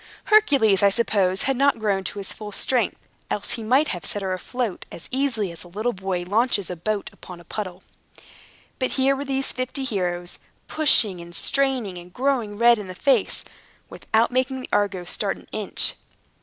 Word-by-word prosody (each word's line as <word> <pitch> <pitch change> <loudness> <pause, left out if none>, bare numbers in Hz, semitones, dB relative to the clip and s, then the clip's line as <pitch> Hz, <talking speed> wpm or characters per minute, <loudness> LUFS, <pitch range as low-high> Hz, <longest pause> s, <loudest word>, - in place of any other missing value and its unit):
Hercules, 275 - +5
I 200 - +6
suppose, 195 -3 +1
had 270 - +2
not 275 +1 +3
grown 205 -3 0
to 205 - -4
his 195 -1 -3
full 210 -1 -8
strength, 240 +1 +1 0.3
else 205 - -2
he 235 - -3
might 260 +7 +3
have 175 -3 -3
set 205 +4 -2
her 190 -1 -1
afloat 220 +2 -3
as - - -9
easily 250 -8 0
as 170 - -10
a - - -13
little 215 +7 -2
boy 190 -2 -3
launches 205 0 +1
his 180 -2 -6
boat 210 +3 -2
upon 180 -2 -11
a - - -14
puddle. 185 0 -6 1.0
But 255 - -1
here 270 +1 +3
were 280 +1 -4
these 270 0 -1
fifty 255 +2 -3
heroes, 180 -7 -1 0.3
pushing, 220 - +4
and 170 0 -10
straining, 255 -10 0
and 175 +1 -13
growing 245 -4 -1
red 235 0 +5
in 205 - -7
the 185 - -8
face, 270 +8 +1 0.5
without 225 +2 +1
making 260 +1 0
the - - -9
Argo 195 -3 +1
start 175 - -2
an - - -16
inch. - - 0
215 Hz, 185 wpm, -23 LUFS, 185-255 Hz, 1.0 s, I